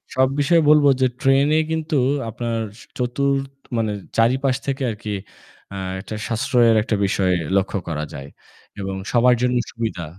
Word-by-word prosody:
সব 130 Hz, 0 st, +4 dB
বিষয়ে 165 Hz, +3 st, +4 dB
বলব 150 Hz, -1 st, +6 dB, 0.2 s
যে 130 Hz, -, +5 dB
ট্রেন 135 Hz, 0 st, +4 dB
এ -, -, +4 dB
কিন্তু 160 Hz, -1 st, -1 dB, 0.3 s
আপনার 115 Hz, +1 st, -3 dB, 0.4 s
৪র্থ 135 Hz, +2 st, 0 dB, 0.3 s
মানে 110 Hz, -2 st, 0 dB, 0.3 s
চারিপাশ 130 Hz, +3 st, +2 dB
থেকে 135 Hz, -1 st, -2 dB
আরকি 105 Hz, 0 st, -5 dB, 0.6 s
আ -, -, -5 dB, 0.2 s
একটা 110 Hz, +2 st, -7 dB
সাশ্রয়ের 115 Hz, 0 st, +3 dB
একটা 110 Hz, -, -1 dB
বিষয় 95 Hz, -1 st, +1 dB, 0.2 s
লক্ষ্য 95 Hz, +1 st, 0 dB
করা 75 Hz, -2 st, -3 dB
যায়। 70 Hz, 0 st, -8 dB, 0.5 s
এবং 95 Hz, 0 st, -3 dB, 0.2 s
সবার 125 Hz, 0 st, +5 dB
জন্য 125 Hz, 0 st, +1 dB, 0.2 s
সুবিধা। 110 Hz, -7 st, -4 dB
125 Hz, 145 wpm, -21 LUFS, 110-135 Hz, 0.6 s, বলব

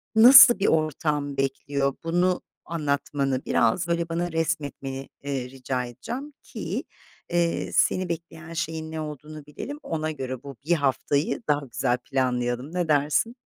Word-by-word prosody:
nasıl 245 Hz, 0 st, +10 dB
bir 195 Hz, -, +2 dB
ortam 150 Hz, -2 st, 0 dB
bekliyor, 135 Hz, 0 st, -1 dB
bunu 180 Hz, +2 st, +1 dB, 0.2 s
anlatmanı 140 Hz, -4 st, -1 dB
biraz, 165 Hz, +10 st, +2 dB
böyle, 170 Hz, 0 st, -1 dB
bana 170 Hz, +1 st, -2 dB
resmetmeni, 145 Hz, -5 st, -3 dB, 0.2 s
ııı, 140 Hz, -, -2 dB
rica 125 Hz, 0 st, -3 dB
edeceğim 245 Hz, -, -7 dB
ki, -, -, -4 dB, 0.5 s
ııı, 170 Hz, -1 st, 0 dB
seni 185 Hz, -1 st, +2 dB
bekleyen 165 Hz, 0 st, -6 dB
şeyin 160 Hz, -1 st, -3 dB
ne 160 Hz, -1 st, -4 dB
olduğunu 150 Hz, 0 st, -8 dB
bilelim, 285 Hz, -, -7 dB
ona 155 Hz, -1 st, -2 dB
göre 130 Hz, -3 st, -5 dB
bu 140 Hz, -2 st, -8 dB
1 175 Hz, -, +3 dB
haftayı 140 Hz, -, 0 dB
daha 145 Hz, -1 st, +1 dB
güzel 125 Hz, 0 st, 0 dB
planlayalım, 125 Hz, +2 st, -1 dB
ne 175 Hz, -2 st, 0 dB
dersin? 150 Hz, -, +2 dB
150 Hz, 140 wpm, -25 LUFS, 135-170 Hz, 0.5 s, nasıl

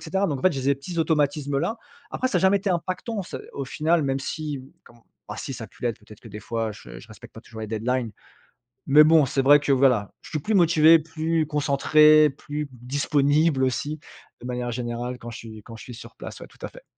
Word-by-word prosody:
cetera. 190 Hz, +4 st, -1 dB
Donc 145 Hz, -6 st, -2 dB
en -, -, -9 dB
fait 185 Hz, -, +4 dB
j'ai 135 Hz, -, -3 dB
zé 140 Hz, +1 st, +2 dB
petits 165 Hz, +6 st, -7 dB
automatismes 145 Hz, -3 st, 0 dB
là. 175 Hz, +10 st, -2 dB, 0.3 s
Après 255 Hz, -, -1 dB
ça -, -, +1 dB
a -, -, -2 dB
jamais 190 Hz, +1 st, +4 dB
été 195 Hz, 0 st, -2 dB
impactant 185 Hz, +5 st, -3 dB
c'est -, -, -7 dB
au 140 Hz, -, -4 dB
final, 155 Hz, +4 st, +1 dB
même 135 Hz, -1 st, -1 dB
si, 150 Hz, 0 st, -4 dB
mmh, 130 Hz, +1 st, -14 dB
comme 115 Hz, -, -19 dB, 0.3 s
bah, 105 Hz, -, -6 dB
si 135 Hz, -, -5 dB
ça 115 Hz, -, -7 dB
a -, -, -9 dB
pu -, -, -21 dB
l'être, 120 Hz, -2 st, -1 dB
peut-être 105 Hz, 0 st, -15 dB
que -, -, -15 dB
des 105 Hz, +1 st, -9 dB
fois, 115 Hz, -1 st, -3 dB
heu, -, -, -7 dB
je -, -, -12 dB
respecte -, -, -14 dB
pas -, -, -10 dB
toujours 110 Hz, -1 st, -11 dB
les 110 Hz, -, -4 dB
deadlines. 115 Hz, +2 st, -2 dB, 0.8 s
Mais 145 Hz, +2 st, +7 dB
bon 155 Hz, -1 st, +5 dB
c'est 135 Hz, -, -1 dB
vrai 145 Hz, +2 st, +6 dB
que 145 Hz, -, 0 dB
voilà, 125 Hz, -6 st, +2 dB
je -, -, -12 dB
suis 155 Hz, -, -2 dB
plus 210 Hz, +10 st, -3 dB
motivé, 165 Hz, -3 st, +6 dB
plus 160 Hz, 0 st, -2 dB
concentré, 150 Hz, +1 st, +4 dB
plus 150 Hz, +2 st, -6 dB
disponible 145 Hz, +3 st, +1 dB
aussi 145 Hz, +4 st, -2 dB, 0.4 s
de 125 Hz, -, -7 dB
manière 125 Hz, -1 st, -3 dB
générale 120 Hz, +1 st, -4 dB
quand 120 Hz, -, -9 dB
je 115 Hz, -, -8 dB
suis 110 Hz, -2 st, -11 dB
quand 115 Hz, -, -11 dB
je -, -, -12 dB
suis 125 Hz, -, -10 dB
sur 115 Hz, -, -12 dB
place, -, -, -9 dB
tout -, -, -10 dB
à -, -, -8 dB
fait. -, -, -15 dB
140 Hz, 240 wpm, -24 LUFS, 125-155 Hz, 0.8 s, Mais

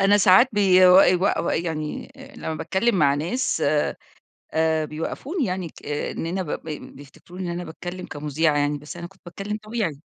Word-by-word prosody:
أنا 195 Hz, +1 st, +5 dB
ساعات 190 Hz, +6 st, +6 dB
بيو 185 Hz, -2 st, +6 dB
يو 180 Hz, -2 st, +4 dB, 0.3 s
و -, -, +1 dB
يعني 160 Hz, -, -3 dB, 0.2 s
لما 160 Hz, -, -4 dB
باتكلم 190 Hz, +8 st, 0 dB
مع 140 Hz, -4 st, +4 dB
ناس، 175 Hz, -, -1 dB, 0.9 s
آآ 160 Hz, -1 st, +2 dB
بيوقفوني 260 Hz, -, -3 dB
يعني 180 Hz, -3 st, -3 dB
ك -, -, -16 dB
إن 145 Hz, +2 st, -3 dB
أنا 185 Hz, +3 st, -2 dB
ب 160 Hz, -, -9 dB
ب 160 Hz, -, -5 dB, 0.3 s
بيفتكروني 160 Hz, +6 st, -11 dB
إن -, -, -2 dB
أنا 175 Hz, +1 st, -4 dB
باتكلم 175 Hz, +2 st, -7 dB
كمُذيعة 150 Hz, +1 st, 0 dB
يعني، 145 Hz, 0 st, +1 dB
بس 150 Hz, +4 st, -10 dB
أنا 170 Hz, 0 st, -6 dB
كنت 190 Hz, +1 st, -25 dB
باتكلم 200 Hz, +4 st, -5 dB
طبيعي. 215 Hz, -10 st, -3 dB
175 Hz, 170 wpm, -23 LUFS, 155-190 Hz, 0.9 s, ساعات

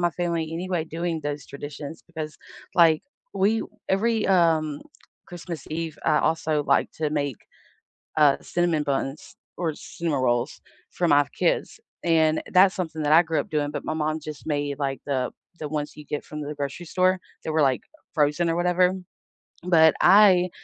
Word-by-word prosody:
my 175 Hz, -, +3 dB
family 170 Hz, -2 st, -2 dB
anyway 175 Hz, 0 st, -2 dB
doing 165 Hz, 0 st, -3 dB
those 145 Hz, -1 st, -4 dB
traditions, 145 Hz, +2 st, -8 dB
because, 155 Hz, -3 st, -6 dB, 0.4 s
like, 165 Hz, -3 st, +5 dB, 0.3 s
we 205 Hz, +3 st, +2 dB, 0.3 s
every, 220 Hz, +3 st, +1 dB
um, 160 Hz, -5 st, +2 dB, 0.5 s
Christmas 170 Hz, -3 st, -7 dB
Eve, 160 Hz, -1 st, -4 dB
I 150 Hz, -, +3 dB
also 160 Hz, -2 st, 0 dB
like 140 Hz, -, +2 dB
to 155 Hz, -2 st, 0 dB
make, 145 Hz, -5 st, -1 dB, 0.8 s
uh, 145 Hz, -2 st, +5 dB
cinnamon 175 Hz, -3 st, 0 dB
buns 135 Hz, 0 st, -3 dB, 0.2 s
or 165 Hz, -3 st, -1 dB
cinnamon 155 Hz, -5 st, -3 dB
rolls 120 Hz, +2 st, 0 dB, 0.3 s
for 175 Hz, -, 0 dB
my 145 Hz, 0 st, +5 dB
kids, -, -, 0 dB, 0.2 s
and 160 Hz, -2 st, +3 dB
that's 190 Hz, +1 st, +6 dB
something 160 Hz, -4 st, -4 dB
that 145 Hz, -, +1 dB
I 165 Hz, -, +8 dB
grew 160 Hz, -1 st, -1 dB
up -, -, -13 dB
doing, 145 Hz, -1 st, -1 dB
but -, -, -5 dB
my -, -, -1 dB
mom 155 Hz, 0 st, -1 dB
just 150 Hz, 0 st, -8 dB
made, 145 Hz, -2 st, -2 dB
like, 135 Hz, -1 st, -2 dB
the 130 Hz, -3 st, -1 dB, 0.3 s
the 150 Hz, -, -4 dB
ones 150 Hz, -1 st, -3 dB
you 150 Hz, -, -10 dB
get 150 Hz, -, -4 dB
from 150 Hz, 0 st, -7 dB
the 150 Hz, +1 st, -4 dB
grocery 140 Hz, +4 st, -5 dB
store, 185 Hz, +2 st, +2 dB, 0.2 s
they -, -, -4 dB
were, 155 Hz, 0 st, +2 dB
like, 135 Hz, -3 st, +2 dB, 0.3 s
frozen 150 Hz, +3 st, +2 dB
or 165 Hz, -, +1 dB
whatever. 180 Hz, +1 st, +3 dB, 0.7 s
But 160 Hz, -3 st, +6 dB
I 185 Hz, -2 st, +6 dB
155 Hz, 170 wpm, -25 LUFS, 145-175 Hz, 0.8 s, I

